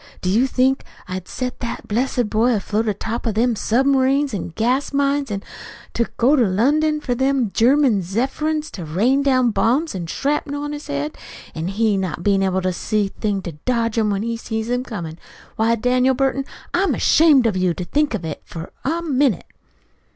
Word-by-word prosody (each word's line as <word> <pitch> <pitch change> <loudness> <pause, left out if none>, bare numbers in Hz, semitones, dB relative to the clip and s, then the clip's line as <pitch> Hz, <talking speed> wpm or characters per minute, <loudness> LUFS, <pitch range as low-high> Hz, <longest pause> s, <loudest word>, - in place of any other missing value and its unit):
Do 185 - 0
you 235 +7 +3
think 260 +1 +1 0.2
I'd 185 0 -5
set 250 -1 -4
that 235 - -5
blessed 245 +1 0
boy 225 +3 +2
afloat 215 +2 -1
on 210 - 0
top 225 +4 -4
of 220 - -1
them 235 +1 +2
submarines 270 +4 +2
an' 195 - -3
gas 245 - 0
mines, 280 -1 +1
an' 200 -1 -4 0.5
to 235 - 0
go 260 +5 +4
to 255 - +4
London 300 +10 +2
for 260 -4 -2
them 265 -3 +1
German 250 -3 +4
Zepherin's 275 - -2
to 180 - -7
rain 215 - +2
down 255 -4 +3
bombs 270 +10 +1
an' 175 -3 -5
shrapnel 285 - -2
on 295 - -4
his 295 0 -7
head, 140 +2 -3 0.3
an' 160 +1 -4
he 210 +1 +1
not 180 -3 -3
bein' 200 -1 +3
able 190 -1 0
to 185 0 0
see 210 +3 0
a - - -21
thing 205 -3 -1
to 170 - -5
dodge 230 -3 0
'em 220 -2 +2
when 200 0 -1
he 230 0 -2
sees 220 0 -4
'em 245 0 0
comin'? 170 -9 -6 0.4
Why, 225 +1 +2
Daniel 250 +3 +2
Burton, 270 +1 0 0.3
I'm 380 +3 +2
ashamed 300 -6 +5
of 220 -4 +2
you 185 -2 +1
to 180 - -5
think 290 +3 +1
of 185 - -5
it, 155 - -5
for 165 0 -8
a 330 +5 -1
minute!" 275 - +1
235 Hz, 195 wpm, -21 LUFS, 200-270 Hz, 0.5 s, ashamed